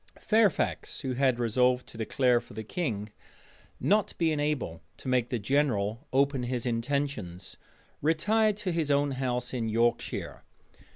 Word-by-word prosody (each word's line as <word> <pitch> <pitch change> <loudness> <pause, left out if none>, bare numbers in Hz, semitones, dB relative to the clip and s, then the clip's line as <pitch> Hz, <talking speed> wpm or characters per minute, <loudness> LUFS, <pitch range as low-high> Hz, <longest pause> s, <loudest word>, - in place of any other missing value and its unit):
Fairfax, 215 -5 +1
who 130 -1 -2
had 130 -1 +2
resolved 125 +2 +2
to - - -14
declare 120 +2 +2
for 120 - -15
the 110 - -4
king, 110 - -3 0.7
not 210 +1 +1
being 160 -3 +1
able 145 - -2 0.2
to - - -10
make 125 -2 +1
the 125 - -1
general 115 0 0
open 135 0 +2
his 125 0 -2
intentions, 115 -7 -2 0.5
retired 205 +8 +2
to 200 -3 -2
his 165 -3 0
own 145 0 +2
house 125 -2 -2
in 115 -3 -1
Yorkshire. 115 +2 0
130 Hz, 140 wpm, -29 LUFS, 115-145 Hz, 0.7 s, had